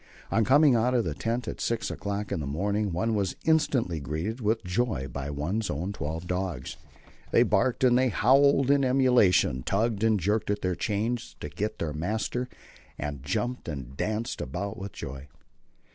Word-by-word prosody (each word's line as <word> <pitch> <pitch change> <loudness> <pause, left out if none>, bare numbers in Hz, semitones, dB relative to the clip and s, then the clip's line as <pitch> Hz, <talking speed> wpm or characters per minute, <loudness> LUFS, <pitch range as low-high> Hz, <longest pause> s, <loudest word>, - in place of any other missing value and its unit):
On 115 - +3
coming 145 +3 +5
out 120 +2 +2
of 120 - +3
the 80 - -1
tent 115 +9 -2
at - - -5
six 115 -1 -1
o'clock 100 +1 -4
in - - -1
the 70 - -4
morning 100 +7 -1
one 95 +7 0
was 100 -4 0
instantly 130 - +2
greeted 80 - -4
with 110 +1 +1
joy 90 - -1
by 70 +1 -5
one's 85 +10 -2
own 90 +7 -3
twelve 80 0 -4
dogs. 90 -7 -3 0.5
They - - +5
barked 130 0 +1
and 125 -1 +5
howled 135 +3 +4
in 140 -1 +4
emulation, 125 - +4
tugged 110 - 0
and 110 -2 +3
jerked 105 +5 0
at 105 0 -1
their 90 -1 +1
chains 115 +6 -2
to 75 - -5
get 105 +9 -3
to - - -2
their 75 - -3
master, 110 +9 -2 0.5
and 70 -2 -4
jumped 120 - -2
and 65 -5 -6
danced 110 +9 -2
about 100 +10 -4
with 100 0 -6
joy. 70 -1 -7
105 Hz, 175 wpm, -27 LUFS, 80-120 Hz, 0.5 s, coming